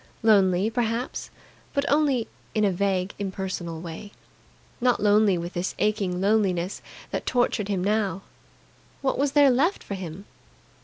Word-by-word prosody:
Lonely, 200 -2 +4
perhaps, 235 +1 -2 0.5
but 280 0 +1
only 280 -5 +2 0.3
in 215 -1 +3
a 200 - +3
vague, 190 0 0
impersonal 190 -4 -4
way. 175 +4 -8 0.7
Not 245 0 +3
lonely 205 -2 +4
with 170 +1 -5
this 175 +1 -2
aching 200 -4 0
loneliness 195 -3 +1 0.3
that - - -3
tortured 245 -4 +1
him 195 -3 -1
now. 200 -1 0 0.8
What 265 - 0
was 280 0 +1
there 285 -2 +6
left 300 +10 +1
for - - -6
him? 185 0 -7
205 Hz, 140 wpm, -25 LUFS, 185-230 Hz, 0.8 s, there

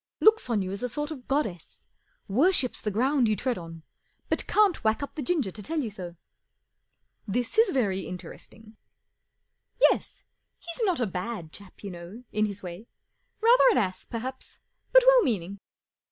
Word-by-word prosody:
Looks 440 - +4
on 215 -4 +1
you 185 - -4
as 200 - -5
a 250 - -2
sort 295 +5 -4
of 265 -5 -8
goddess. 220 - -3 0.4
Worships 265 - +2
the 210 - -1
ground 250 +4 +2
you 215 - +2
tread 245 +1 -2
on, 165 -1 -10 0.5
but - - 0
can't 410 -8 +3
whack 220 +5 +1
up 280 - -6
the 305 - -5
ginger 280 - 0
to 210 - -7
tell 320 +9 -2
you 235 -7 -2
so." 180 -4 -8 0.6
" - - -48
This 245 - 0
is 455 - +6
very 200 -8 0
interesting." 215 +4 -11 0.5
" - - -51
Yes. - - -5 0.3
He's 340 +7 -5
not 365 -7 +1
a 240 - +1
bad 185 -3 -5
chap, 200 0 -11
you 200 - -5
know, 175 +7 -10
in 215 0 +1
his 200 -1 -7
way. 180 +5 -8 0.5
Rather 470 +3 +6
an 445 - +3
ass, 185 -2 -1
perhaps, 255 +3 -6 0.3
but - - +7
well - - +7
meaning. 200 - -2
225 Hz, 180 wpm, -27 LUFS, 195-295 Hz, 0.6 s, but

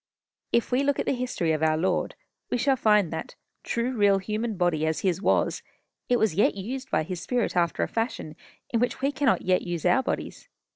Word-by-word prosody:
If 235 - +1
we 250 +2 +3
look 280 0 +1
at - - -1
the - - +1
history 245 -10 -1
of 155 -1 0
our 155 0 +3
Lord, 180 +4 0 0.3
we - - 0
shall 270 +2 +2
find 210 -8 +3
that, 160 - -6 0.3
true 240 +2 -2
real 205 -3 +4
human 215 +2 -3
body 175 -4 +1
as 160 - -1
his 185 -1 0
was, - - +1 0.5
it 245 - +4
was 220 -6 +2
yet 200 +3 +3
used 255 +7 -5
by 155 - +1
his 175 +2 -5
spirit 245 +3 -1
after 170 -1 +1
a - - 0
fashion 225 -9 -3 0.4
in 230 - +1
which 245 +2 -1
we 275 +1 +1
cannot 280 -3 +1
yet 185 0 +2
use 175 -3 -4
our 265 - +4
bodies. - - -5
210 Hz, 210 wpm, -26 LUFS, 175-245 Hz, 0.5 s, real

